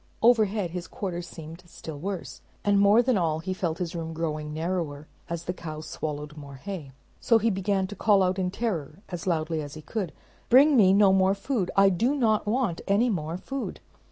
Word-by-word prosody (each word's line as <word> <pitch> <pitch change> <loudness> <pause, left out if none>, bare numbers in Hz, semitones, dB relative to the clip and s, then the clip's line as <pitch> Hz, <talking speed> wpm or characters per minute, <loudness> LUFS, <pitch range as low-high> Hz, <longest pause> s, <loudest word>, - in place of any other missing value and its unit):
Overhead 215 -6 +3
his 175 -1 -5
quarters 175 -2 -5
seemed 165 +1 -10
still 160 -3 -8
worse, 190 +1 -5 0.2
and 200 -1 +4
more 205 +4 +6
than 245 -5 +2
all, 160 -3 +1
he 175 +4 -3
felt 170 -3 -2
his 175 -2 -3
room 165 -1 -4
growing 155 -2 -3
narrower, 160 -2 -3 0.2
as 170 0 -3
the 180 - -3
cow 155 -3 -7
swallowed 150 -1 -5
more 140 -2 -10
hay. 160 -2 -7 0.3
So 230 - +4
he 225 +1 +1
began 195 0 0
to 205 - -7
call 205 -3 +4
out 185 +1 0
in 180 -1 0
terror 185 -5 -3
as 175 -1 -6
loudly 160 -2 0
as 145 0 -7
he 155 - -9
could, 195 -5 -3 0.4
"Bring 280 +4 +7
me 200 -6 +6
no 195 -1 +5
more 190 0 +4
food. 200 -3 -1
I 195 0 +6
do 230 +10 +1
not 220 -6 +2
want 220 -6 0
any 225 +5 +3
more 165 -3 -2
food!" 270 +7 -5
185 Hz, 200 wpm, -27 LUFS, 160-205 Hz, 0.4 s, Bring